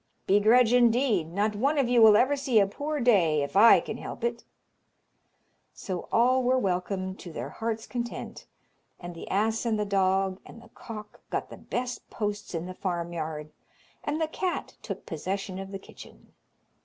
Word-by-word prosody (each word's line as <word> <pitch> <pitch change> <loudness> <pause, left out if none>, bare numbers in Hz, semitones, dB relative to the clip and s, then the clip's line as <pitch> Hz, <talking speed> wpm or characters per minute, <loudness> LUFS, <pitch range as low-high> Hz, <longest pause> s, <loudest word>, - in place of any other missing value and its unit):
"Begrudge, 220 +4 +5
indeed! 235 - +3
Not 205 +3 0
one 280 +8 +1
of 275 -3 +2
you 245 -1 +4
will 215 -2 +8
ever 260 +5 +3
see 265 -5 +2
a 200 - +5
poor 290 +9 -4
day 175 - +3
if 140 - -6
I 225 +4 +8
can - - -6
help - - -8
it." 235 0 -2 1.3
So 185 -3 -5
all 255 +3 +4
were 255 +1 +2
welcomed 185 -2 -2
to 175 - -9
their - - -5
hearts' 225 0 -4
content, 240 -1 -6 0.5
and 175 0 -7
the 165 - -9
ass 220 +3 +1
and 225 -3 0
the 210 - 0
dog 190 -1 +1
and - - -13
the 230 - -17
cock 215 -2 -10
got - - -3
the - - -9
best 245 0 -5
posts 205 -3 -4
in 165 +1 -3
the 185 - -6
farmyard, 170 -4 -4 0.5
and 295 +2 -2
the 320 - +1
cat 360 +3 -3
took - - -7
possession 190 +4 -4
of 195 0 -7
the 195 - -4
kitchen. 195 - -15
210 Hz, 175 wpm, -27 LUFS, 185-240 Hz, 1.3 s, will